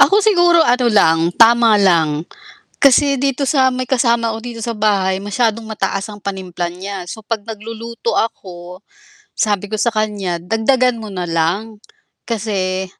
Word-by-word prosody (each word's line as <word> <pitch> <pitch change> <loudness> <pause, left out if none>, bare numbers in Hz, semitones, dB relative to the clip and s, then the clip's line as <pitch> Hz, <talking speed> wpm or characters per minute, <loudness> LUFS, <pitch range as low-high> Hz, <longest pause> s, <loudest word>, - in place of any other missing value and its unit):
Ako 410 +2 +5
siguro 350 -5 +4
ano 245 0 +2
lang, 165 -7 +4 0.2
tama 230 -1 +5
lang. 165 -6 +2 0.6
Kasi 280 0 +4
dito 275 +1 -1
sa 260 -2 +2
may 255 0 -4
kasama 235 -3 +1
ko 220 - -5
dito 235 -1 -8
sa 230 -1 -4
bahay, 195 -3 +1
masyadong 220 +2 -1
mataas 195 -2 -3
ang 205 -1 -11
panimpla 185 -3 -4
niya. 190 +1 -7
So 220 -2 -9
'pag 225 -1 -2
magluluto 230 +1 -6
ako, 180 -4 -4 0.6
sabi 205 -2 -1
ko 215 0 -4
sa 235 - +2
kanya 210 -5 -2
dagdagan 230 +6 +1
mo 215 - -7
nalang, 180 +4 -2 0.5
kasi 190 -4 -2
215 Hz, 150 wpm, -17 LUFS, 190-235 Hz, 0.6 s, Ako